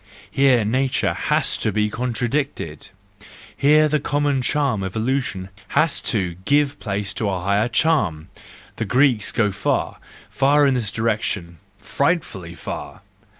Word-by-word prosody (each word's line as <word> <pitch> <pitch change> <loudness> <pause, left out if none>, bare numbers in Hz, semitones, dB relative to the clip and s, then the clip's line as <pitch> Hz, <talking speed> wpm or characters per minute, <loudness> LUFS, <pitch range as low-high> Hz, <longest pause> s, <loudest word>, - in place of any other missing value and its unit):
Here 130 -5 +3
nature 130 +4 0
has - - 0
to - - -1
be 105 0 0
contradicted! 120 - -3 0.7
Here 155 +2 +4
the 150 0 +1
common 145 -1 0
charm 135 -5 0
of 95 +1 -5
illusion 110 -5 -2 0.3
has 155 -2 +4
to 90 -6 -1
give 145 +3 +1
place 100 -2 -3
to 110 - -1
a 95 -2 -2
higher 100 +4 +1
charm! 105 - +1 0.5
The 110 - -2
Greeks 125 -2 +2
go 105 -3 +1
far, - - -2 0.3
far 145 +2 +3
in 135 - +3
this 120 -5 0
direction 105 -7 -2 0.2
—frightfully 125 - -2
far! - - -7
115 Hz, 135 wpm, -21 LUFS, 100-140 Hz, 0.7 s, Here